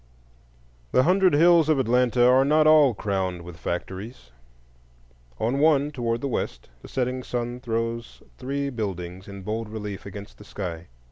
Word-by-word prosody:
The 130 - +5
hundred 185 0 +4
hills 165 0 +5
of 155 - +4
Atlanta 125 -1 +3
are 130 +1 +5
not 155 +2 +3
all 150 -6 +6
crowned 95 -4 -2
with 85 0 -10
factories. 95 - -6 1.1
On 120 +5 0
one, 150 -1 +3
toward 120 -4 -2
the 140 - -2
west, - - -4
the - - -11
setting 130 0 -2
sun 120 0 -4
throws 115 -1 -4 0.2
three 140 +2 -3
buildings 95 -5 -5
in 100 -1 -9
bold 110 +2 -4
relief 105 -3 -6
against 100 +2 -10
the - - -11
sky. 90 -5 -6
120 Hz, 150 wpm, -25 LUFS, 100-135 Hz, 1.1 s, all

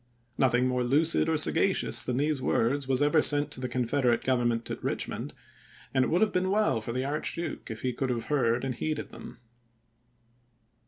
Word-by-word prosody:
Nothing 125 -1 +2
more 125 -1 0
lucid 155 +6 +2
or 160 - +1
sagacious 165 +5 +2
than 125 0 -3
these 145 -1 0
words 130 +2 0
was 135 +1 +1
ever 150 +2 +3
sent 145 0 +3
to - - -4
the 125 -1 -4
Confederate 125 0 0
Government 120 -3 0
at - - -5
Eichmond; - - -3 0.6
and 130 -1 +3
it - - 0
would 175 - +1
have 220 - +2
been 185 +1 0
well 205 - +1
for 115 - -5
the 130 +2 -2
Archduke 150 +3 -3
if 110 0 -7
he 125 -1 -1
could 130 +2 -3
have 115 -2 -2
heard 125 -4 0
and 135 -1 -2
heeded 150 +4 -4
them. - - -11
130 Hz, 190 wpm, -28 LUFS, 125-150 Hz, 0.6 s, ever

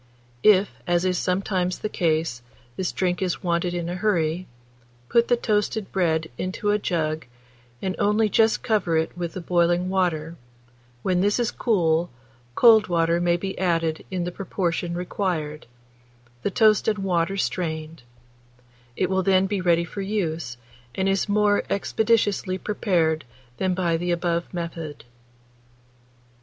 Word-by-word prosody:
If, 205 -2 +5 0.2
as 175 +1 +2
is 180 -1 +1
sometimes 185 -1 0
the - - -3
case, 160 -9 0 0.3
this 185 +4 -2
drink 180 -1 -1
is 185 0 -2
wanted 175 0 0
in 170 -1 -3
a 175 - -3
hurry, 180 -3 0 0.6
put 235 0 +3
the 245 - +3
toasted 210 -2 -1
bread 160 -5 0
into 190 +3 -1
a 210 - +2
jug, 155 -6 -2 0.6
and 190 -1 -1
only 210 +2 +3
just 220 +1 +2
cover 195 -7 +1
it 160 +1 -1
with 175 -2 -4
the 185 - -5
boiling 175 +1 +1
water; 170 -4 -1 0.7
when 180 -1 +1
this 205 +4 +2
is 240 - +1
cool, 170 -6 +1 0.5
cold 220 -3 +6
water 170 0 +1
may 175 0 +2
be 190 +2 -4
added 165 -3 0
in 185 -2 -2
the 175 - -3
proportion 175 -2 -2
required, 175 -4 -3 0.7
the - - 0
toast 215 +2 +3
and 215 -1 +2
water 190 -1 0
strained; 160 -4 -3 0.9
it 185 - +1
will 190 0 +1
then 190 0 +3
be 195 -1 -1
ready 170 -1 +3
for 200 +4 -6
use, 170 - -2 0.4
and 190 - 0
is 195 +1 +1
more 205 0 +3
expeditiously 205 -2 +1
prepared 175 -7 0 0.3
than 185 -1 0
by 170 -3 +1
the 175 +2 -3
above 170 0 -1
method. 165 -4 -6
180 Hz, 145 wpm, -24 LUFS, 170-195 Hz, 0.9 s, cold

